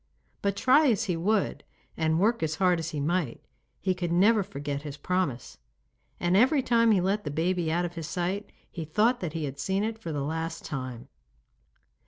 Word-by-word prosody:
But 200 -1 0
try 260 +8 +5
as 225 -3 +2
he 185 -5 -1
would 200 +5 0 0.3
and 160 0 +1
work 225 +5 +2
as 155 -1 0
hard 180 -1 +3
as 165 0 -3
he 155 -3 -4
might 155 -3 -1 0.4
he 185 - +1
could 175 -2 -3
never 205 +5 +4
forget 145 -7 -4
his 145 -1 -7
promise, 140 - -2 0.6
and 175 +1 +1
every 260 +6 +4
time 230 -1 +3
he 210 -4 +5
let 195 +4 0
the 150 - -3
baby 165 +2 0
out 175 +2 +1
of 175 - -5
his 165 -3 -6
sight 185 +4 -3 0.2
he 165 - -5
thought 215 +10 +2
that 170 -4 -4
he 165 -2 -3
had 140 0 -6
seen 190 +7 0
it 220 0 -3
for 170 -7 -5
the 145 -2 -2
last 160 +2 -4
time. 130 -4 -5
175 Hz, 200 wpm, -28 LUFS, 155-205 Hz, 0.6 s, try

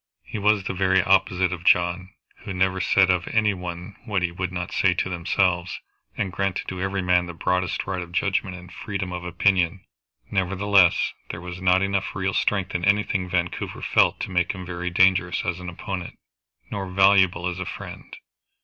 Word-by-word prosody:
He 110 - -6
was 105 0 +3
the 95 - -3
very 95 0 +2
opposite 95 -2 +2
of 90 -1 -7
John, 90 +1 +2 0.3
who 95 - -7
never 95 0 +1
said 95 0 +4
of 90 0 -1
any 105 -2 +2
one 90 +1 -7
what 100 -5 -1
he 90 - 0
would 90 +1 -4
not 90 -1 -4
say 90 -2 +2
to 95 - -1
themselves, 90 0 0 0.4
and 100 -3 -1
granted 100 0 -2
to 95 0 -5
every 95 0 -1
man 90 -1 +2
the 85 - -8
broadest 90 +1 -1
right 95 -1 -3
of 85 -1 -8
judgment 95 0 0
and 90 -1 -12
freedom 95 -4 -4
of 90 0 -5
opinion. 90 0 +1 0.5
Nevertheless 95 -1 +3 0.2
there - - -5
was 90 +1 -8
not 90 +1 +3
enough 100 -1 -1
real 95 0 -1
strength 100 -3 0
in 90 - -2
anything 100 -2 +1
Vancouver 90 -1 -2
felt - - +3
to - - -4
make 90 -1 +1
him 95 -2 -8
very 90 0 -4
dangerous 90 0 +2
as 85 0 -2
an 90 0 -6
opponent, 90 0 -6 0.5
nor 95 -2 -4
valuable 95 -2 +4
as 90 0 -3
a 90 - -3
friend. - - -9
90 Hz, 185 wpm, -24 LUFS, 90-95 Hz, 0.5 s, said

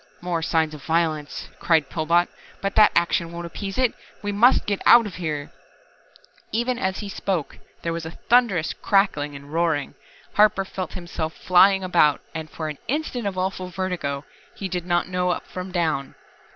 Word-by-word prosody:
"More 175 -2 -2
signs 160 -2 +1
of 150 - -9
violence," 160 -3 -1
cried 160 -4 +3
Pillbot. 170 +3 +2 0.3
"But 195 0 -2
that 215 -1 +6
action 170 0 +1
won't 170 0 -6
appease 195 +3 -6
It 255 -3 +2 0.3
we 205 - -1
must 230 +5 +4
get 200 -1 -1
out 235 -1 +8
of 200 - -7
here 150 -5 -3 0.5
" - - -27 0.3
Even 240 +2 0
as 190 0 -1
he 205 - -5
spoke 190 -5 -3 0.2
there 165 - -1
was 165 0 -4
a 160 - -5 0.2
thunderous 230 -10 +3
crackling 150 -8 +1
and 140 +2 -11
roaring. 165 -4 0 0.4
Harper 210 -2 +4
felt 185 -2 -5
himself 170 -3 -4
flying 190 +2 +5
about, 170 -5 +3
and 160 -1 -5
for 160 - -5
an 150 -2 -6
instant 260 -6 -2
of 190 -2 -4
awful 185 0 -2
vertigo 175 -6 -3 0.3
he 195 - -4
did 180 -1 -4
not 175 -1 +1
know 180 0 0
up 180 - -2
from 185 0 -7
down. 160 -6 -1
175 Hz, 180 wpm, -24 LUFS, 160-195 Hz, 0.5 s, out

